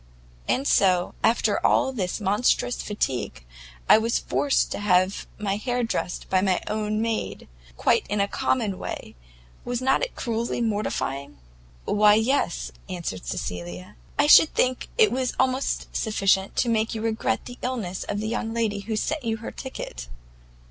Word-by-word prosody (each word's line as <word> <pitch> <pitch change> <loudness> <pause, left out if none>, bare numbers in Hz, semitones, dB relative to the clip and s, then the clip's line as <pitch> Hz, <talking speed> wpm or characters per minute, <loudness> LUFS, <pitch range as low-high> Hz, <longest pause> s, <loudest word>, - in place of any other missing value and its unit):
And 270 +2 +1
so, 180 -2 +3
after 230 - +2
all 265 - +3
this 190 -5 -2
monstrous 210 +4 +1
fatigue, 125 - -3 0.4
I - - +8
was 230 +1 +1
forced 285 -2 +1
to - - -3
have 185 -1 +2
my 200 -1 -1
hair 245 +2 -1
dressed 225 -5 -3
by 185 -1 +2
my 190 -2 +2
own 215 0 -1
maid, 225 -1 -3 0.3
quite - - +2
in 205 - -1
a 200 - +2
common 210 -3 -1
way; - - -6 0.5
was 245 -1 -2
not 265 +1 +2
it - - -3
cruelly 235 -1 -2
mortifying?" 175 - -2 0.5
"Why 210 0 +5
yes," 245 +6 0 0.2
answered 170 - -5
Cecilia, 90 +5 -5 0.2
"I - - +4
should 305 +1 +7
think 255 0 +1
it 440 -3 +5
was 255 0 -1
almost 260 +1 0
sufficient 195 -3 +1
to 245 - +1
make 225 0 +1
you 220 - -4
regret 225 0 -1
the 245 0 -9
illness 220 -8 -3
of 205 - -3
the 215 - -3
young 225 0 -2
lady 220 -3 0
who 215 +2 -4
sent 295 +7 -1
you 225 -1 -1
her 225 - -7
ticket." - - -7
215 Hz, 160 wpm, -25 LUFS, 190-245 Hz, 0.5 s, I